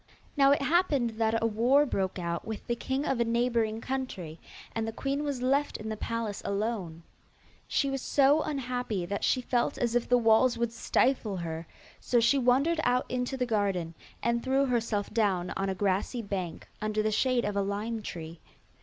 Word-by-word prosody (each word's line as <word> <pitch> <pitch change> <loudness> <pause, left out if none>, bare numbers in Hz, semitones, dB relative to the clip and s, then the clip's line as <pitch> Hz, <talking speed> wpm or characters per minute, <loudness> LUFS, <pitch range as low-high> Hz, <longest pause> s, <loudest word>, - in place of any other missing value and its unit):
Now 275 -2 +5
it 280 0 +3
happened 295 -7 +2
that 225 0 +1
a - - +3
war 240 +6 +4
broke 190 -8 -2
out 170 -1 -3
with 220 -1 -6
the 240 - -1
king 265 +4 -2
of 265 - 0
a - - +4
neighbouring 230 -1 0
country, 210 -13 -4 0.3
and 225 0 -2
the - - -2
queen 275 +5 -2
was 280 -4 -3
left 275 +3 +1
in 215 +1 -6
the 215 - -2
palace 225 -1 -3
alone. 200 -6 -3 0.6
She 280 - +1
was 270 -1 -2
so 285 +3 +4
unhappy 250 -9 -2
that 200 +3 -3
she 255 - +2
felt 240 -1 0
as 235 -1 0
if 240 -1 0
the 245 - +5
walls 235 +1 +4
would 235 -1 -1
stifle 230 -3 +1
her, 165 -1 -5 0.3
so 240 - +2
she 235 +4 +4
wandered 270 +7 +3
out 250 +1 +2
into 250 +1 -2
the 250 - 0
garden, 200 -7 0 0.3
and 235 0 +1
threw 270 +2 +2
herself 230 -5 -1
down 195 -5 +1
on 195 0 -2
a 190 - -1
grassy 200 +5 0
bank, 190 -4 -4
under 215 0 0
the 215 - +1
shade 250 +2 +2
of 205 - -2
a 200 - +2
lime 210 +3 -2
tree. 165 -4 -7
230 Hz, 190 wpm, -29 LUFS, 205-255 Hz, 0.6 s, Now